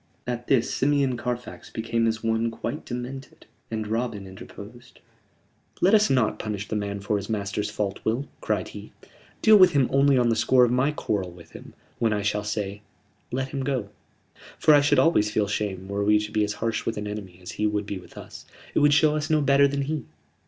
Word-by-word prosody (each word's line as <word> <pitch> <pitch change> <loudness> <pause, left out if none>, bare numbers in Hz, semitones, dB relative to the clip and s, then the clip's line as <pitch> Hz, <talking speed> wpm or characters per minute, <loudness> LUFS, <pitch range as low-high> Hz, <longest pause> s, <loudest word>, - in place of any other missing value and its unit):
At 120 -1 -4
this 125 -4 +2
Simeon 140 -2 +2
Carfax 125 0 -5
became 115 0 -1
as 110 0 -2
one 115 0 +1
quite 115 +6 -5
demented, 125 +2 -7 0.2
and 110 -1 -3
Robin 110 -2 -2
interposed. 105 +6 -12 0.8
"Let 190 +4 +4
us 215 0 +5
not 125 -5 +1
punish 105 -2 -4
the - - -2
man 100 -1 -3
for 105 +1 0
his 100 +1 -6
master's 105 -1 -2
fault, 100 -1 -3
Will," 120 +6 -1
cried - - -1
he. - - -10 0.5
"Deal 215 -1 +8
with 185 -3 +7
him 135 -4 +3
only 140 0 +4
on 120 -1 +3
the 115 - +2
score 125 +2 +4
of 120 - -1
my 130 +3 +2
quarrel 105 -10 -2
with 85 -1 -15
him, - - -12 0.2
when 115 -2 +2
I 105 -1 -1
shall 105 0 0
say 105 -1 -3 0.5
let 130 +1 -2
him 135 0 -4
go. 130 -7 -2 0.7
For 155 - +5
I 145 - +7
should 145 0 +3
always 130 -11 +4
feel 105 -1 0
shame 100 -2 -3
were 100 +1 -2
we 105 +1 +4
to 105 0 -3
be 105 -1 +1
as 105 0 -1
harsh 115 0 -2
with 115 - -3
an 105 - -4
enemy 105 -4 -7
as 90 - -8
he 105 - 0
would 105 -1 -1
be 100 -2 -5
with 90 - -16
us. - - -10 0.3
It - - +2
would 145 0 +5
show 155 -1 +4
us 150 +1 -2
no 155 -1 +3
better 140 0 +4
then 140 0 -2
he." 150 -2 -3
115 Hz, 215 wpm, -25 LUFS, 105-135 Hz, 0.8 s, Deal